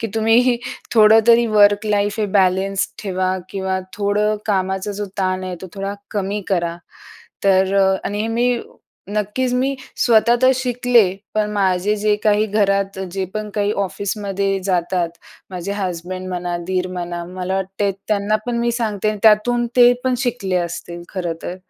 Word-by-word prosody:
की 225 Hz, -, -2 dB
तुम्ही 230 Hz, +3 st, +3 dB, 0.4 s
थोडं 220 Hz, 0 st, +7 dB
तरी 235 Hz, 0 st, +6 dB
वर्क 205 Hz, 0 st, +4 dB
लाईफ 205 Hz, +1 st, 0 dB
हे 210 Hz, -, +1 dB
बॅलेन्स 190 Hz, +1 st, +1 dB
ठेवा 185 Hz, -1 st, -1 dB
किंवा 190 Hz, -1 st, -2 dB, 0.2 s
थोडं 210 Hz, +1 st, +1 dB
कामाचा 190 Hz, 0 st, -1 dB
जो 205 Hz, +1 st, -4 dB
ताण 185 Hz, 0 st, 0 dB
आहे, 185 Hz, -1 st, -4 dB
तो -, -, -5 dB
थोडा 195 Hz, 0 st, -4 dB, 0.2 s
कमी 205 Hz, 0 st, -2 dB
करा. 170 Hz, -3 st, 0 dB, 0.7 s
तर 190 Hz, 0 st, +3 dB
अ, 190 Hz, -1 st, +4 dB
आणि 205 Hz, +1 st, -2 dB
हे 220 Hz, -, -1 dB
मी 240 Hz, +1 st, +1 dB, 0.5 s
नक्कीच 210 Hz, +5 st, -1 dB
मी 265 Hz, +2 st, +1 dB, 0.3 s
स्वतः 235 Hz, 0 st, +5 dB
तर 255 Hz, -, +7 dB
शिकले, 245 Hz, -3 st, +3 dB, 0.3 s
पण 210 Hz, -1 st, 0 dB
माझे 195 Hz, 0 st, +1 dB
जे 210 Hz, 0 st, +2 dB
काही 210 Hz, 0 st, +3 dB
घरात 195 Hz, -2 st, 0 dB
जे 190 Hz, -1 st, -2 dB
पण 215 Hz, 0 st, -4 dB
काही 205 Hz, 0 st, +1 dB
ऑफिसमध्ये 195 Hz, 0 st, -2 dB
जातात 175 Hz, -2 st, 0 dB, 0.4 s
माझे 185 Hz, +2 st, -4 dB
हसबंड 185 Hz, -1 st, -4 dB
म्हणा, 175 Hz, -1 st, -3 dB
दीर 185 Hz, -1 st, -1 dB
म्हणा, 175 Hz, -1 st, -4 dB
मला 185 Hz, +1 st, -4 dB
वाटते 195 Hz, +1 st, -1 dB, 0.2 s
त्यांना 210 Hz, 0 st, +1 dB
पण 240 Hz, -1 st, -1 dB
मी 235 Hz, 0 st, 0 dB
सांगते 215 Hz, -3 st, -1 dB
अन् 210 Hz, -, -5 dB
त्यातून 235 Hz, +3 st, +4 dB
ते 245 Hz, 0 st, +7 dB
पण 255 Hz, -, +2 dB
शिकले 200 Hz, -7 st, -1 dB
असतील 175 Hz, 0 st, -7 dB
खरंतर. 175 Hz, -1 st, -4 dB
200 Hz, 160 wpm, -19 LUFS, 185-215 Hz, 0.7 s, थोडं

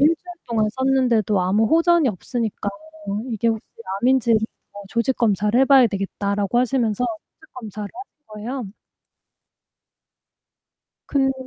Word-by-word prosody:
주일 330 Hz, +1 st, +3 dB, 0.3 s
동안 220 Hz, -2 st, +1 dB
썼는데도 245 Hz, -6 st, +2 dB
아무 195 Hz, +5 st, +2 dB
호전이 330 Hz, -1 st, +4 dB
없으니까 220 Hz, +1 st, -3 dB, 0.6 s
이게 230 Hz, 0 st, 0 dB
혹시 220 Hz, -1 st, -1 dB, 0.4 s
암인지 245 Hz, -2 st, +3 dB, 0.5 s
조직 235 Hz, +4 st, 0 dB
검사를 210 Hz, 0 st, +2 dB
해봐야 270 Hz, -2 st, +6 dB
되겠다."라고 200 Hz, +1 st, -1 dB
하시면서 245 Hz, -2 st, +1 dB
조직 335 Hz, +6 st, -8 dB
검사를 215 Hz, -4 st, -6 dB
하신 350 Hz, -5 st, -13 dB
거예요. 230 Hz, +5 st, -5 dB, 2.4 s
그런데 270 Hz, -1 st, +2 dB
235 Hz, 285 characters per minute, -22 LUFS, 210-265 Hz, 2.4 s, 해봐야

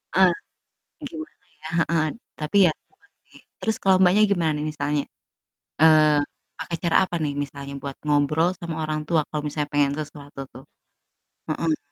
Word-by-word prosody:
Ah, 185 Hz, -2 st, +6 dB, 0.8 s
gimana 320 Hz, -1 st, -8 dB, 0.3 s
ya, 155 Hz, -, -7 dB
heeh, 165 Hz, -1 st, +2 dB, 0.3 s
tapi 155 Hz, +6 st, 0 dB
ya 160 Hz, -, +4 dB, 0.2 s
tobat 400 Hz, +1 st, -31 dB, 0.2 s
sih, -, -, -17 dB, 0.2 s
terus 220 Hz, 0 st, 0 dB
kalau 190 Hz, -1 st, +5 dB
Mbaknya 190 Hz, +4 st, +5 dB
gimana 165 Hz, -5 st, +2 dB
nih 150 Hz, -, -3 dB
misalnya? 145 Hz, 0 st, -1 dB, 0.8 s
Eee, 155 Hz, -2 st, +6 dB, 0.4 s
pakai 170 Hz, -, -4 dB
cara 170 Hz, -, +3 dB
apa 175 Hz, -, -5 dB
nih 145 Hz, -, -1 dB
misalnya 140 Hz, 0 st, -8 dB
buat 140 Hz, -1 st, -6 dB
ngobrol 150 Hz, +3 st, +3 dB
sama 170 Hz, -2 st, -5 dB
orang 155 Hz, 0 st, -2 dB
tua 165 Hz, -2 st, +3 dB
kalau 150 Hz, -, -2 dB
misalnya 150 Hz, 0 st, -2 dB
pengen 145 Hz, -1 st, +3 dB
sesuatu 145 Hz, -2 st, -8 dB
tuh? 130 Hz, -, -11 dB, 0.9 s
Heeh. 155 Hz, 0 st, 0 dB
155 Hz, 155 wpm, -24 LUFS, 145-175 Hz, 0.9 s, Ah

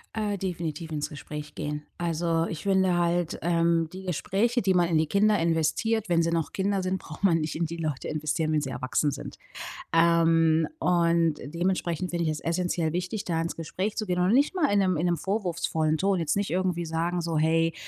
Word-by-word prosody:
Äh, 210 Hz, -2 st, -1 dB
definitiv 170 Hz, -4 st, -4 dB
ins 150 Hz, -1 st, -2 dB
Gespräch 150 Hz, 0 st, -8 dB
gehen. 150 Hz, 0 st, -4 dB
Also, 165 Hz, -1 st, 0 dB
ich 160 Hz, -, -5 dB
finde 190 Hz, -2 st, +2 dB
halt, 170 Hz, -1 st, 0 dB
ähm, 170 Hz, -1 st, +2 dB
die 190 Hz, +1 st, -8 dB
Gespräche, 200 Hz, -, 0 dB
die 190 Hz, -1 st, +2 dB
man 175 Hz, -1 st, +4 dB
in 165 Hz, -2 st, +2 dB
die 160 Hz, -, +1 dB
Kinder 210 Hz, +4 st, +3 dB
investiert, 170 Hz, +7 st, +1 dB
wenn 170 Hz, -2 st, +3 dB
sie 165 Hz, -, +1 dB
noch 165 Hz, -2 st, -1 dB
Kinder 195 Hz, 0 st, 0 dB
sind, 185 Hz, +1 st, -1 dB
braucht 155 Hz, +4 st, -11 dB
man 170 Hz, -4 st, +4 dB
nicht 155 Hz, 0 st, -3 dB
in 170 Hz, -, 0 dB
die 170 Hz, +1 st, -5 dB
Leute 155 Hz, -5 st, -3 dB
investieren, 155 Hz, +1 st, -1 dB
wenn 155 Hz, -1 st, +2 dB
sie 135 Hz, -, -4 dB
erwachsen 130 Hz, +3 st, 0 dB
sind. 140 Hz, -, -7 dB, 0.6 s
Ähm, 165 Hz, -1 st, +4 dB
und 170 Hz, -, +2 dB
dementsprechend 175 Hz, +2 st, -1 dB
finde 170 Hz, -1 st, -1 dB
ich -, -, +1 dB
es 155 Hz, -1 st, -3 dB
essenziell 170 Hz, -1 st, -1 dB
wichtig, 180 Hz, +5 st, -3 dB
da 165 Hz, -2 st, -1 dB
ins 165 Hz, -, -3 dB
Gespräch 185 Hz, +6 st, -3 dB
zu 215 Hz, -, -2 dB
gehen 180 Hz, -2 st, -1 dB
und 180 Hz, +4 st, +3 dB
nicht 280 Hz, +7 st, +3 dB
mal 350 Hz, -6 st, +2 dB
in 205 Hz, -, +3 dB
'nem 185 Hz, -3 st, +2 dB
in 165 Hz, -, 0 dB
'nem 175 Hz, -1 st, +2 dB
vorwurfsvollen 170 Hz, -5 st, -1 dB
Ton. 195 Hz, +2 st, +1 dB
Jetzt 160 Hz, -2 st, 0 dB
nicht 200 Hz, 0 st, -1 dB
irgendwie 180 Hz, -1 st, 0 dB
sagen 165 Hz, +2 st, -1 dB
so: 165 Hz, -1 st, -2 dB
„Hey, 165 Hz, +1 st, +2 dB
170 Hz, 210 wpm, -27 LUFS, 160-185 Hz, 0.6 s, man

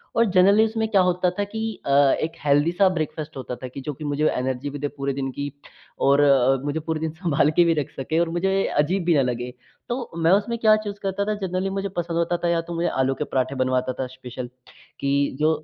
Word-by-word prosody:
और 230 Hz, -, +4 dB
जनरली 200 Hz, +3 st, +5 dB
उसमें 220 Hz, 0 st, -1 dB
क्या 200 Hz, -3 st, +4 dB
होता 180 Hz, 0 st, +2 dB
था 205 Hz, -, +2 dB
कि 210 Hz, +2 st, -6 dB, 0.3 s
अ, -, -, -3 dB, 0.3 s
एक 165 Hz, -, -2 dB
हेल्दी 145 Hz, +3 st, +3 dB
सा 190 Hz, +2 st, +4 dB
ब्रेकफास्ट 155 Hz, -2 st, -4 dB
होता 125 Hz, -1 st, -5 dB
था 130 Hz, -, -7 dB
कि 135 Hz, +2 st, -8 dB
जो 150 Hz, +1 st, -4 dB
कि 155 Hz, -, -10 dB
मुझे 145 Hz, +1 st, 0 dB
एनर्जी 130 Hz, +2 st, -2 dB
भी 145 Hz, 0 st, -7 dB
दे 145 Hz, -, -1 dB
पूरे 140 Hz, 0 st, -1 dB
दिन 135 Hz, -1 st, -3 dB
की 145 Hz, +2 st, -5 dB, 0.6 s
और 140 Hz, +1 st, +5 dB
अ, 135 Hz, -2 st, +4 dB
मुझे 145 Hz, +2 st, -1 dB
पूरे 160 Hz, 0 st, -3 dB
दिन 160 Hz, -1 st, -2 dB
संभाल 160 Hz, -3 st, +1 dB
के 175 Hz, -, +7 dB
भी 165 Hz, -, +3 dB
रख -, -, -7 dB
सके 155 Hz, +5 st, 0 dB
और 170 Hz, -1 st, +1 dB
मुझे 195 Hz, +3 st, +1 dB
अजीब 175 Hz, +6 st, +1 dB
भी 170 Hz, -, +3 dB
न -, -, +4 dB
लगे। 120 Hz, +1 st, -4 dB, 0.4 s
तो 240 Hz, 0 st, -3 dB
मैं 165 Hz, +1 st, +3 dB
उसमें 210 Hz, +4 st, +2 dB
क्या 215 Hz, -1 st, +6 dB
चूज़ 205 Hz, -1 st, -6 dB
करता 195 Hz, +1 st, -1 dB
था 215 Hz, -, 0 dB
जनरली 185 Hz, +2 st, -1 dB
मुझे 195 Hz, +1 st, -3 dB
पसंद 170 Hz, -1 st, -2 dB
होता 170 Hz, +1 st, +1 dB
था -, -, +2 dB
या 170 Hz, -, +2 dB
तो 170 Hz, -, -5 dB
मुझे 170 Hz, +1 st, 0 dB
आलू 135 Hz, 0 st, +1 dB
के 150 Hz, -, -2 dB
पराठे 130 Hz, -1 st, -1 dB
बनवाता 130 Hz, 0 st, 0 dB
था 130 Hz, -, 0 dB
स्पेशल 125 Hz, -1 st, -8 dB, 0.5 s
कि 140 Hz, -, -1 dB, 0.3 s
जो 155 Hz, +1 st, +3 dB
160 Hz, 240 wpm, -23 LUFS, 140-185 Hz, 0.6 s, के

